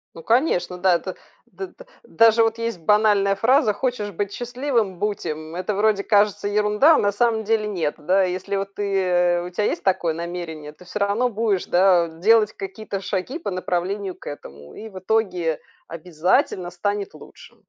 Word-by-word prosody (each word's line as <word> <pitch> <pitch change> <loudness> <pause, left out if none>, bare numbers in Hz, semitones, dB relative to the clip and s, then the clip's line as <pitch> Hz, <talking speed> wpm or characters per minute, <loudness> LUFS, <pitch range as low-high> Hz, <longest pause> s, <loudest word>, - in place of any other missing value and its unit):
Ну, 165 - -10
конечно, 225 - +1
да, 185 -1 +4
это - - -4 0.3
д 385 - -8
д - - -16 0.2
даже 230 0 +4
вот 225 0 0
есть 230 -4 -3
банальная 205 +2 +3
фраза: 235 0 +3
хочешь 215 -3 -2
быть 200 +2 -3
счастливым- 245 -6 -2
будь 210 -1 -2
им. 155 +1 -5
Это 185 +3 -2
вроде, 205 -1 +2
кажется, 205 -1 +2
ерунда, 210 +9 +4
а - - +3
на 205 - +2
самом 225 +1 +1
деле- 215 0 0
нет. 170 -8 -2
Да, 185 +5 +2
если 185 +2 -3
вот 195 0 -3
ты 180 -3 +1
у 180 - -6
тя 195 +4 -2
есть - - -1
такое 185 -4 +1
намерение, 165 -3 -6
ты 180 - -17
всё 210 +4 -5
равно 205 +5 +1
будешь, 215 -4 -1
да, 180 -1 +4
делать 210 +7 +3
какие-то 195 0 -6
шаги 195 - -3
по 320 - -5
направлению 185 +1 -2
к - - -17
этому, 75 - -10
и 220 - -9
в 190 - -11
итоге 185 -5 0 0.3
обязательно 175 - -1
станет 200 +3 -3
лучше, - - -15
200 Hz, 175 wpm, -22 LUFS, 180-220 Hz, 0.3 s, да